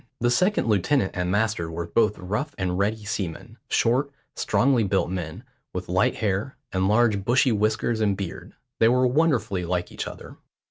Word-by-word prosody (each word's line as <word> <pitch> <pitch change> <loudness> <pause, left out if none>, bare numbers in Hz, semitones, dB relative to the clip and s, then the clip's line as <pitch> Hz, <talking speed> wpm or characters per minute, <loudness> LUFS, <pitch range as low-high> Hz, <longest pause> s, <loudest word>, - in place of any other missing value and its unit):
The 120 0 +2
second 185 +12 +2
lieutenant 110 +2 +2
and 90 -1 -2
master 105 -4 0
were 85 +1 -4
both 105 +4 +1
rough 105 +11 -3
and 90 -2 -1
ready 105 +3 -1
seamen, 95 -6 -5
short, 130 +5 +2 0.3
strongly 125 -3 +2
built 95 -3 0
men, 85 -4 -5 0.3
with - - -5
light - - +2
hair, 105 +5 -2
and 95 0 +1
large 105 -2 +3
bushy 125 +4 +3
whiskers 110 +1 0
and 100 -3 +1
beard; 95 -4 -7 0.2
they 115 - +6
were 125 +1 +3
wonderfully 125 - +1
like 90 0 -2
each - - -5
other. - - -10
105 Hz, 170 wpm, -25 LUFS, 95-120 Hz, 0.3 s, they